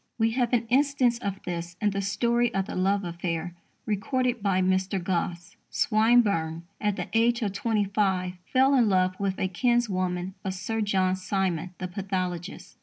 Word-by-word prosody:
We 225 -1 +2
have 240 0 0
an 235 -2 +2
instance 255 -1 +2
of 200 -3 -4
this 170 -1 -5
in 210 -1 +1
the 195 0 -2
story 235 +4 +1
of 195 -1 +1
the - - -7
love 195 +2 +1
affair 170 -1 -3 0.3
recorded 245 +3 -1
by 195 -2 +1
Mr. 185 +1 +1
Gosse. 175 -1 -3
Swinburne, 215 -8 +2 0.2
at 210 -2 +1
the - - -4
age 235 +1 +3
of 200 -2 -1
twenty 210 0 0
five, 190 -3 0 0.2
fell 265 +1 +4
in 240 -5 +4
love 185 -1 +2
with 195 -1 -1
a 190 - 0
kinswoman 185 -4 0
of 190 -2 -3
Sir 225 +4 -2
John 190 -3 +1
Simon, 185 -2 -2
the 185 - -4
pathologist. 185 -1 -4
195 Hz, 170 wpm, -27 LUFS, 185-225 Hz, 0.3 s, fell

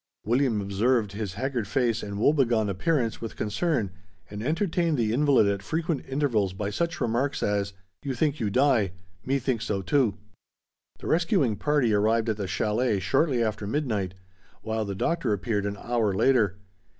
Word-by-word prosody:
William 120 -2 +2
observed 105 +2 +1
his 100 -2 -5
haggard 130 -6 -2
face 115 0 +1
and 100 -1 -5
woe 115 +8 +4
begone 115 -7 +2
appearance 115 - 0
with 115 - -6
concern 110 - -1 0.4
and 105 0 -6
entertained 165 - 0
the 110 -2 +1
invalid 140 -3 +4
at 100 -1 0
frequent 160 - -2
intervals 120 -9 +1
by 100 +2 -3
such 170 +8 -2
remarks 120 +5 0
as, 100 -1 0 0.3
"You 135 -2 -3
think 150 +1 0
you 110 - 0
die, 120 -6 +2 0.3
me 135 +2 +1
think 130 -3 -1
so 100 -4 -2
too." 115 -1 +2 0.8
The - - -11
rescuing 165 - +2
party 145 -3 +1
arrived 110 +2 +2
at 110 - -1
the 100 -2 -3
chalet 105 +3 0
shortly 130 - +2
after 110 -2 -2
midnight, 105 - -1 0.5
while 110 0 -2
the 100 -1 -4
Doctor 150 - 0
appeared 105 0 -1
an 100 0 -4
hour 115 -5 0
later. 105 -5 +3
115 Hz, 165 wpm, -26 LUFS, 105-140 Hz, 0.8 s, woe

